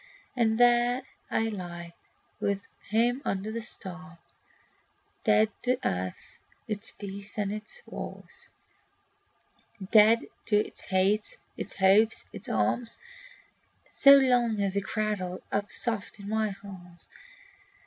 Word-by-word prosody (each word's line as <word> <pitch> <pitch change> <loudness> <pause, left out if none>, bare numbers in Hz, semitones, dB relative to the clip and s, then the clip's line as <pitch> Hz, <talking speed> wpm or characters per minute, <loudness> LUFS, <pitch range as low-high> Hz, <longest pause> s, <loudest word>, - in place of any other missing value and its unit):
And 225 -2 +2
here 245 +1 +4 0.3
I 225 - +1
lie 175 -4 -6 0.5
with 200 -1 0 0.3
him 240 +4 +2
under 195 +3 -2
the 230 +1 -3
stars, 180 -6 -7 1.1
Dead 215 0 +4
to 250 0 +1
earth, 90 0 -4 0.3
its 215 0 -3
peace 200 0 -9
and 205 -1 0
its 220 - -8
wars; - - -8 1.4
Dead 220 +1 +7 0.3
to 215 - +3
its 210 - -1
hates, 195 +3 +1 0.2
its - - -5
hopes, 200 +4 +4
and - - -31
its - - -7
harms, 235 -1 0 0.9
So 280 0 +8
long 245 -5 +3
as 200 -1 0
he 200 - +1
cradles 195 -3 -2
up 205 0 -1
soft 225 -3 -2
in 200 - -8
my 215 -1 0
arms. 180 -3 -11
210 Hz, 120 wpm, -28 LUFS, 195-230 Hz, 1.4 s, So